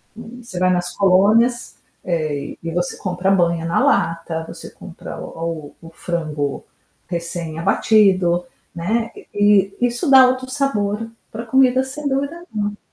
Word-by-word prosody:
você 230 -3 -10
vai 185 0 +3
nas 175 -1 -1
colônias, 210 +6 +3 0.3
eh, 155 -5 -2
e 165 - -3
você 175 +1 -2
compra 185 0 -2
banha 170 -3 +2
na 170 - +1
lata, 165 -1 0
você - - -9
compra - - -10
o 165 -3 -6
o 165 - -11
frango 155 -4 -3 0.5
recém 170 -2 -4
abatido, 185 -2 +3 0.3
né, 220 +7 -1 0.2
e 205 -1 +3
e 245 - +4
isso 245 +6 -2
dá 265 -1 +8
outro 255 0 -3
sabor 225 -6 -1 0.2
para 230 +2 -7
comida, 260 +1 +3
sem 285 +3 -5
dúvida 280 +5 -2
nenhuma. 205 -1 -2
195 Hz, 140 wpm, -20 LUFS, 170-235 Hz, 0.5 s, dá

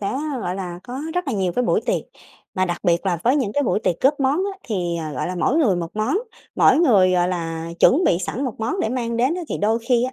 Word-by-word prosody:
sẽ, 200 - -2 0.3
gọi 180 -2 -3
là, 180 -2 -5
có 255 +2 -6
rất 360 -3 -1
là - - -1
nhiều 190 -4 0
cái 250 - +2
buổi - - +2
tiệc. - - 0 0.5
Mà 185 -2 +1
đặc 175 -1 -2
biệt 175 0 +1
là 175 -2 +1
với 255 +5 +4
những 245 -8 -1
cái 285 - +1
buổi 220 - 0
tiệc 170 - -1
góp 280 +2 +2
món 270 +2 +2 0.2
á, 390 - -14
thì, 175 -6 -2
ờ, 155 -2 -5
gọi - - -2
là, 185 - -3
mỗi 255 - +1
người 225 - +3
một 170 -1 -4
món, 215 - +1 0.4
mỗi - - +5
người, 200 - +4
gọi 180 0 +2
là, 165 -2 -3
chuẩn 325 +8 +5
bị 170 - +3
sẵn 220 +8 -3
một 250 -5 -3
món 240 - -1
để - - 0
mang 235 -1 -2
đến 255 +7 +2
á 360 - -4
thì - - -3
đôi 220 +3 +1
khi 245 -1 +3
á 255 - -3
215 Hz, 280 wpm, -21 LUFS, 180-260 Hz, 0.5 s, mỗi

